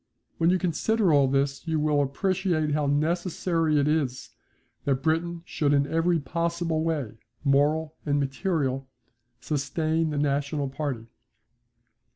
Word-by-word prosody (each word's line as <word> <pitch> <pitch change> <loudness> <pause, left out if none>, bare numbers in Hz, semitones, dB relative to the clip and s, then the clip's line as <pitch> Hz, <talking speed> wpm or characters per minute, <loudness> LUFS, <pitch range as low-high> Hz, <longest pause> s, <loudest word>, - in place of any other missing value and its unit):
When 165 - +4
you 185 - +4
consider 185 +2 +1
all 140 -2 +5
this 140 +3 0
you 160 -1 +1
will 150 -1 +2
appreciate 165 +2 0
how 145 -1 +1
necessary 165 +1 +1
it 140 - +2
is 145 -5 -1 0.5
that 135 -2 0
Britain 165 +2 0
should 145 -4 0
in 140 -1 +3
every 165 +3 +1
possible 165 +2 -1
way, 145 -9 -2 0.2
moral 150 +3 +2
and 145 -1 +1
material, 135 -2 -1 0.5
sustain 155 +2 0
the 150 - -3
national 145 0 0
party. 135 -5 -4
150 Hz, 130 wpm, -26 LUFS, 140-165 Hz, 0.5 s, all